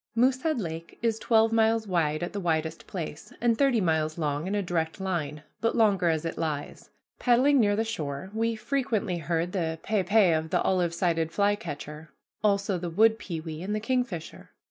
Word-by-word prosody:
Moosehead 260 Hz, +4 st, +2 dB
Lake 165 Hz, -3 st, -6 dB
is 225 Hz, -1 st, +1 dB
twelve 225 Hz, -1 st, +3 dB
miles 225 Hz, 0 st, +3 dB
wide 165 Hz, -5 st, 0 dB
at 175 Hz, -, -4 dB
the 205 Hz, -, -3 dB
widest 160 Hz, -2 st, -2 dB
place, 160 Hz, -4 st, -6 dB
and 235 Hz, -1 st, +3 dB
thirty 265 Hz, -1 st, +3 dB
miles 160 Hz, -3 st, 0 dB
long 150 Hz, 0 st, -1 dB
in 200 Hz, -, -1 dB
a 205 Hz, -, 0 dB
direct 165 Hz, -2 st, -2 dB
line, 155 Hz, -6 st, -3 dB, 0.2 s
but 230 Hz, -, 0 dB
longer 200 Hz, -6 st, +3 dB
as 160 Hz, 0 st, 0 dB
it 165 Hz, -, -4 dB
lies. 150 Hz, -3 st, -4 dB, 0.3 s
Paddling 260 Hz, +3 st, +4 dB
near 205 Hz, -3 st, +3 dB
the 220 Hz, -, +1 dB
shore, 160 Hz, -5 st, -4 dB
we 225 Hz, +1 st, 0 dB
frequently 220 Hz, -7 st, -1 dB
heard 170 Hz, +2 st, -1 dB
the 165 Hz, -4 st, -2 dB
pe 215 Hz, -2 st, +1 dB
pe 195 Hz, 0 st, +4 dB
of 160 Hz, 0 st, -1 dB
the -, -, +1 dB
olive 175 Hz, -3 st, +1 dB
sided 165 Hz, -2 st, 0 dB
flycatcher, 160 Hz, -6 st, -2 dB, 0.3 s
also 200 Hz, -2 st, +1 dB
the 175 Hz, 0 st, -4 dB
wood 220 Hz, +6 st, +4 dB
pewee 160 Hz, -2 st, -6 dB
and 205 Hz, +3 st, -2 dB
the -, -, 0 dB
kingfisher. 230 Hz, -8 st, -3 dB
185 Hz, 185 wpm, -27 LUFS, 160-220 Hz, 0.3 s, Paddling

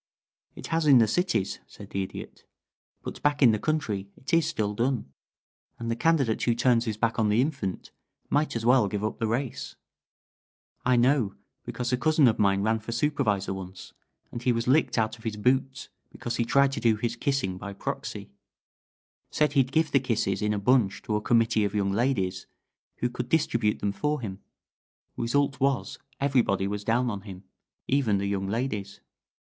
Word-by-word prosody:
"It -, -, -9 dB
has 165 Hz, -1 st, +1 dB
in 140 Hz, -3 st, +8 dB
the 115 Hz, -2 st, +5 dB
cities," 175 Hz, -, 0 dB
said -, -, -13 dB
the 95 Hz, -, -1 dB
Idiot. 95 Hz, -, -8 dB, 0.6 s
"But -, -, -7 dB
back 145 Hz, -1 st, +2 dB
in 120 Hz, -, +8 dB
the 110 Hz, -, 0 dB
country 110 Hz, -11 st, -2 dB
it 130 Hz, -, -8 dB
is 165 Hz, -1 st, +4 dB
still 105 Hz, -1 st, -1 dB
done, 120 Hz, -, -1 dB, 0.6 s
and 115 Hz, 0 st, -3 dB
the -, -, 0 dB
candidate 135 Hz, -6 st, +1 dB
who 120 Hz, -, +2 dB
turns 120 Hz, -1 st, +3 dB
his 110 Hz, -3 st, -3 dB
back 115 Hz, 0 st, 0 dB
on 110 Hz, -1 st, +2 dB
the 105 Hz, +2 st, +3 dB
infant 130 Hz, -, -2 dB, 0.4 s
might 150 Hz, -2 st, 0 dB
as 115 Hz, -1 st, -2 dB
well 125 Hz, -3 st, +5 dB
give 100 Hz, +1 st, -3 dB
up 110 Hz, -, -3 dB
the 115 Hz, -, 0 dB
race. 120 Hz, +3 st, -3 dB, 1.1 s
I 125 Hz, 0 st, +3 dB
know, 120 Hz, -4 st, +2 dB, 0.3 s
because 125 Hz, 0 st, -3 dB
a -, -, +3 dB
cousin 155 Hz, 0 st, +4 dB
of 110 Hz, -, +1 dB
mine 100 Hz, -1 st, +3 dB
ran 110 Hz, +1 st, +1 dB
for 110 Hz, +2 st, -7 dB
supervisor 110 Hz, -7 st, 0 dB
once, 95 Hz, 0 st, -9 dB, 0.4 s
and 120 Hz, -, -6 dB
he 125 Hz, -, +2 dB
was 115 Hz, 0 st, -1 dB
licked 140 Hz, +2 st, +3 dB
out 110 Hz, +1 st, 0 dB
of -, -, -17 dB
his 110 Hz, -2 st, -3 dB
boots 130 Hz, +4 st, 0 dB, 0.2 s
because 120 Hz, 0 st, -5 dB
he 115 Hz, -, +1 dB
tried 140 Hz, +3 st, +3 dB
to -, -, -3 dB
do 115 Hz, -2 st, +3 dB
his 115 Hz, +2 st, -2 dB
kissing 125 Hz, -9 st, -1 dB
by 100 Hz, 0 st, -6 dB
proxy 100 Hz, 0 st, -5 dB, 1.0 s
said 150 Hz, -1 st, +1 dB
he'd 135 Hz, -3 st, +2 dB
give 160 Hz, +1 st, +1 dB
the 135 Hz, -, +4 dB
kisses 110 Hz, -6 st, -1 dB
in 105 Hz, 0 st, +1 dB
a 105 Hz, -, 0 dB
bunch 110 Hz, -1 st, +2 dB
to 105 Hz, -, -2 dB
a 105 Hz, -, 0 dB
committee 115 Hz, -1 st, +2 dB
of 100 Hz, +1 st, -2 dB
young 100 Hz, -1 st, +1 dB
ladies, 100 Hz, -5 st, -1 dB, 0.5 s
who 125 Hz, -, +1 dB
could 125 Hz, 0 st, -5 dB
distribute 115 Hz, -9 st, +1 dB
them 100 Hz, -, -1 dB
for 150 Hz, +8 st, -1 dB
him. 100 Hz, -5 st, -6 dB, 0.8 s
Result 130 Hz, +3 st, 0 dB
was 135 Hz, -1 st, 0 dB, 0.2 s
everybody 120 Hz, -9 st, +1 dB
was 105 Hz, 0 st, -4 dB
down 120 Hz, +3 st, +1 dB
on 100 Hz, -2 st, -5 dB
him 95 Hz, -2 st, -10 dB, 0.4 s
even 130 Hz, -7 st, +2 dB
the 100 Hz, -, -2 dB
young 100 Hz, -1 st, -2 dB
ladies." 105 Hz, -3 st, -3 dB
115 Hz, 190 wpm, -27 LUFS, 105-135 Hz, 1.1 s, in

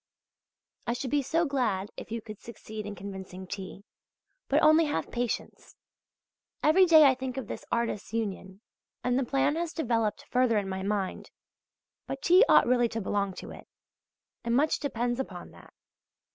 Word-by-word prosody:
I 235 Hz, -, +1 dB
should 250 Hz, +1 st, -4 dB
be 290 Hz, 0 st, +3 dB
so 330 Hz, +5 st, +1 dB
glad 220 Hz, -9 st, -1 dB
if -, -, -9 dB
you 230 Hz, 0 st, -3 dB
could 215 Hz, -2 st, -9 dB
succeed 215 Hz, -2 st, -8 dB
in 205 Hz, -, -6 dB
convincing 190 Hz, -1 st, -8 dB
T.! 195 Hz, +1 st, -7 dB, 0.6 s
But -, -, +2 dB
only 310 Hz, +1 st, +6 dB
have 160 Hz, -, -2 dB
patience! 240 Hz, -1 st, -4 dB, 0.9 s
Every 365 Hz, +5 st, +5 dB
day 315 Hz, -3 st, +8 dB
I 270 Hz, -, +6 dB
think 260 Hz, 0 st, -5 dB
of 265 Hz, -, -3 dB
this -, -, -7 dB
artists' 235 Hz, -3 st, -1 dB
union, 200 Hz, -3 st, -4 dB, 0.4 s
and 250 Hz, +1 st, +1 dB
the -, -, +1 dB
plan 275 Hz, +4 st, +1 dB
has 335 Hz, -1 st, -2 dB
developed 225 Hz, -7 st, -1 dB
further 250 Hz, -3 st, +3 dB
in 200 Hz, -2 st, -1 dB
my 190 Hz, 0 st, -4 dB
mind; 195 Hz, -1 st, -2 dB, 0.8 s
but -, -, -5 dB
T. 365 Hz, +5 st, +7 dB
ought -, -, +7 dB
really 240 Hz, -1 st, +3 dB
to 225 Hz, -, -3 dB
belong 200 Hz, -1 st, -1 dB
to -, -, -8 dB
it, -, -, -12 dB, 0.8 s
and 235 Hz, 0 st, 0 dB
much 300 Hz, +4 st, +2 dB
depends 240 Hz, -3 st, -2 dB
upon 265 Hz, -, -6 dB
that. -, -, -16 dB
235 Hz, 170 wpm, -28 LUFS, 205-270 Hz, 0.9 s, day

